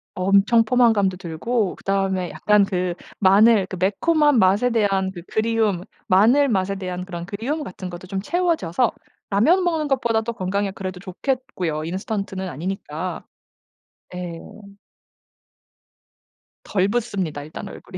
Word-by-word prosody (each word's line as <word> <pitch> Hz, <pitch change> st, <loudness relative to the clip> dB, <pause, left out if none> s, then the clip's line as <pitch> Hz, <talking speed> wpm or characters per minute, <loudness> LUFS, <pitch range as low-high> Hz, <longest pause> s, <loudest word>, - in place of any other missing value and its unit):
엄청 200 Hz, +5 st, +4 dB
포만감도 220 Hz, -6 st, +3 dB
들고 190 Hz, +5 st, -2 dB
그다음에 195 Hz, -2 st, -1 dB
약간 210 Hz, -1 st, +3 dB
그 180 Hz, -2 st, -1 dB, 0.3 s
마늘 205 Hz, +1 st, +5 dB
그 190 Hz, -, -6 dB
매콤한 295 Hz, -, +3 dB
맛에 200 Hz, +6 st, +4 dB
대한 195 Hz, -5 st, +1 dB
그 175 Hz, -2 st, -9 dB
그리움 220 Hz, -4 st, 0 dB, 0.3 s
마늘 235 Hz, +9 st, +5 dB
맛에 195 Hz, -2 st, 0 dB
대한 180 Hz, -1 st, -5 dB
그런 175 Hz, -2 st, -6 dB
그리움 245 Hz, -, -3 dB
같은 185 Hz, -6 st, -7 dB
것도 175 Hz, +1 st, -9 dB
좀 195 Hz, 0 st, -3 dB
채워져서 315 Hz, -, 0 dB, 0.4 s
라면 305 Hz, -, +3 dB
먹는 320 Hz, -4 st, 0 dB
것보다도 235 Hz, -4 st, 0 dB
건강에 200 Hz, -1 st, -2 dB
그래도 185 Hz, -1 st, -6 dB
좋겠고요, 185 Hz, -, -3 dB
인스턴트는 190 Hz, +2 st, -4 dB
아니니까. 185 Hz, +7 st, -5 dB, 0.9 s
예. 175 Hz, -2 st, -5 dB, 2.2 s
덜 195 Hz, -1 st, +1 dB
붓습니다, 200 Hz, -10 st, -2 dB
일단 160 Hz, +7 st, -8 dB
얼굴이. 190 Hz, -1 st, -10 dB
195 Hz, 290 characters per minute, -22 LUFS, 185-230 Hz, 2.2 s, 마늘